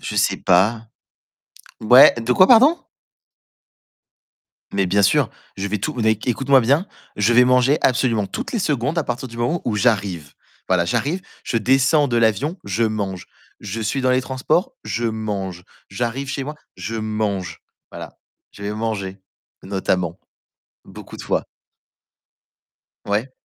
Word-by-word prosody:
je - - -5
sais - - +2
pas. 110 +6 +2 0.9
Ouais, 125 +4 +7
de 120 +1 0
quoi 185 - +6
pardon? 265 +8 +6 1.9
Mais 100 -1 +1
bien 100 +3 +2
sûr, 100 +1 +3 0.3
je 95 +1 -3
vais 105 +1 -2
tout 100 - -4
n 115 - 0
é - - +5
écoute-moi 130 +5 +2
bien, 140 - +2 0.3
je 105 +3 +2
vais 125 +1 +6
manger 125 +3 +3
absolument 120 -5 +1
toutes 95 - -6
les 235 - -1
secondes 150 - -1
à 155 - 0
partir 125 +1 -4
du 115 - -12
moment 120 +9 -1
où 105 -3 -1
j'arrive. 95 - 0 0.4
Voilà, 90 -2 +2
j'arrive, 125 - -1 0.2
je - - -2
descends 135 +5 +3
de 120 - 0
l'avion, 115 - +1
je 100 +3 -2
mange. 100 -5 -2 0.3
Je 105 +2 -5
suis 115 +5 -1
dans 130 - +1
les 125 0 +3
transports, 130 - -1
je 120 - -3
mange. 100 -5 -4 0.3
J'arrive 120 +6 -3
chez 135 - -3
moi, 150 +2 -7 0.2
je 95 +5 -5
mange, 110 -4 -3 0.3
voilà. - - -10 0.3
Je 100 - -13
vais 105 +1 -3
manger 100 -4 -4 0.4
notamment 95 -2 -2 0.7
beaucoup - - -11
de - - -9
fois. - - -1 1.6
Ouais. 105 +6 -1
115 Hz, 150 wpm, -20 LUFS, 100-130 Hz, 1.9 s, Ouais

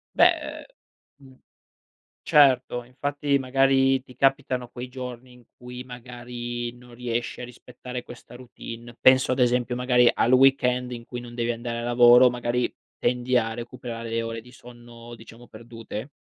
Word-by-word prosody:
Beh, - - +7
ehm, - - -8 0.5
mhmm, 130 -2 -18 0.8
certo 130 -4 +4
infatti 140 +3 -1
magari 135 0 +2
ti 125 - -16
capitano 135 -1 +1
quei 125 +1 -8
giorni 125 -1 -8
in 125 0 -18
cui 125 0 -9
magari 120 -1 -7
non 120 0 -16
riesci 120 -1 -4
a - - -5
rispettare 125 0 -9
questa 120 0 -13
routine, 120 -1 -10
penso 130 0 +5
ad 130 - -1
esempio 125 0 +1
magari 125 -1 +4
al 120 - +2
weekend 125 -1 +3
in 120 -1 -7
cui 125 - -7
non 120 0 -11
devi 120 0 -1
andare 115 0 -5
a - - -5
lavoro, 120 +1 +6
magari 120 0 -2 0.3
tendi 125 +1 +1
a 115 -1 0
recuperare 120 -1 -7
le 115 0 -1
ore 115 0 -5
di 125 +2 -17
sonno 120 -1 -13
diciamo 115 +2 -15
perdute? 115 +1 -9
125 Hz, 155 wpm, -25 LUFS, 120-125 Hz, 0.8 s, Beh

